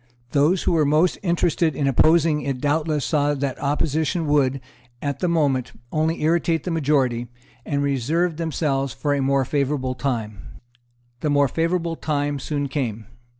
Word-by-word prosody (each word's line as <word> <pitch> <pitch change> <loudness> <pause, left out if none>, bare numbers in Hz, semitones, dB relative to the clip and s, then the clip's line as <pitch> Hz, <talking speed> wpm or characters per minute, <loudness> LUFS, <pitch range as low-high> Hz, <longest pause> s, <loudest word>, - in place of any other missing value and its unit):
Those 155 +6 +2
who - - +1
were 165 -3 +3
most 155 +5 +2
interested 170 -3 +1
in 140 - -1
opposing 155 +3 +3
it 135 -1 -3
doubtless 150 0 0
saw 145 -2 +1
that 140 -2 -3
opposition 155 +4 0
would, 140 -2 +2 0.4
at 140 0 -3
that 180 - 0
moment, 140 -7 +1 0.2
only 160 +1 0
irritate 165 -1 +1
the 180 - -3
majority, 135 -6 +1 0.4
and 140 -2 0
reserved 150 +5 0
themselves 145 -4 -1
for 145 -1 -1
a 140 - 0
more 135 0 +2
favourable 140 -2 -1
time. 115 -6 -3 0.8
The 150 - -1
more 145 -1 +3
favourable 165 +3 -1
time 145 -2 -1
soon 145 0 -2
came. 120 -6 -3
145 Hz, 150 wpm, -22 LUFS, 135-160 Hz, 0.8 s, were